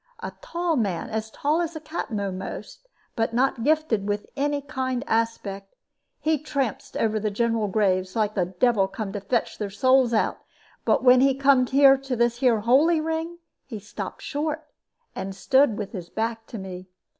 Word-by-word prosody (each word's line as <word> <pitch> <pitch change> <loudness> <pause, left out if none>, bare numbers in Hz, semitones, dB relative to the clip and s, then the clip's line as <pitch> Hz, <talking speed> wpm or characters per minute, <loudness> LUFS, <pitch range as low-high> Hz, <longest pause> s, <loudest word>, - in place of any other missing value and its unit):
A - - -5
tall 345 -9 -1
man, 195 -8 -1
as 220 0 -3
tall 300 +8 0
as 335 -1 -3
the - - -4
Captain 300 -8 -4
a'most, 195 - -6 0.3
but 225 0 -1
not 255 -1 +1
gifted 295 -9 +1
with 205 0 -1
any 290 +1 0
kind 260 -2 -3
aspect. 220 -5 -2 0.4
He 315 -1 +1
trampsed 275 -6 -3
over 220 -1 +1
the 215 0 -1
general 225 0 0
graves, 185 -2 +1
like 215 -2 +1
the 185 -4 +1
devil 195 +2 +2
come 195 0 -5
to 205 - -4
fetch 230 +4 -1
their 210 -2 -2
souls 255 +4 +3
out; 220 - +1 0.5
but - - +2
when 250 0 +7
he 270 0 +4
come 270 -2 +4
here 275 +1 +6
to 270 -1 -4
the 240 +2 +2
'holy 305 +7 +4
ring,' 325 +2 -3 0.3
he 230 -5 -7
stopped 205 0 -7
short, 305 +1 -3 0.5
and 195 0 -5
stood 260 +2 +3
with 205 -2 -5
his 180 -5 -7
back 225 0 -3
to 230 - -7
me. 185 -2 -8
235 Hz, 175 wpm, -25 LUFS, 205-280 Hz, 0.5 s, when